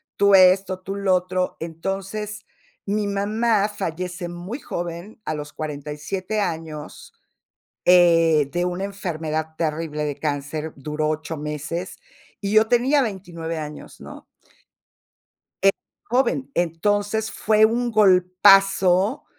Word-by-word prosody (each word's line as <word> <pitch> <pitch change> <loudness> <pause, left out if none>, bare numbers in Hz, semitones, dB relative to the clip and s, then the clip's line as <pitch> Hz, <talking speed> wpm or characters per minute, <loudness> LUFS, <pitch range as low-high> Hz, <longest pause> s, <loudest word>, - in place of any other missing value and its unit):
tú 200 0 +4
esto, 185 0 +5
tú 195 +1 -6
lo 195 -2 +1
otro". 185 0 -1
Entonces, 195 +6 -5 0.4
mi 205 +1 -1
mamá 210 +1 +1
fallece 180 -2 -4
muy 180 +10 -6
joven, 175 +5 -6
a 155 - -2
los 150 0 -7
47 155 +7 -4
años, 160 -5 -5 0.7
eh, 165 -4 +5
de 175 0 0
una 180 +2 -2
enfermedad 160 -5 -4
terrible 155 -1 -2
de 145 -2 -3
cáncer, 150 +1 -3
duró 150 +2 -2
8 155 +1 -3
meses, 150 +4 -5 0.4
y 200 0 -3
yo 215 +1 +5
tenía 265 +4 +3
29 175 -6 -5
años, 150 -1 -8
¿no? - - -11 1.4
Eh, 195 0 +6 0.4
joven, 265 +2 +1
entonces, 205 +6 0
fue 215 0 +3
un 240 +2 0
golpazo 195 +1 +4
180 Hz, 115 wpm, -23 LUFS, 160-205 Hz, 1.4 s, Eh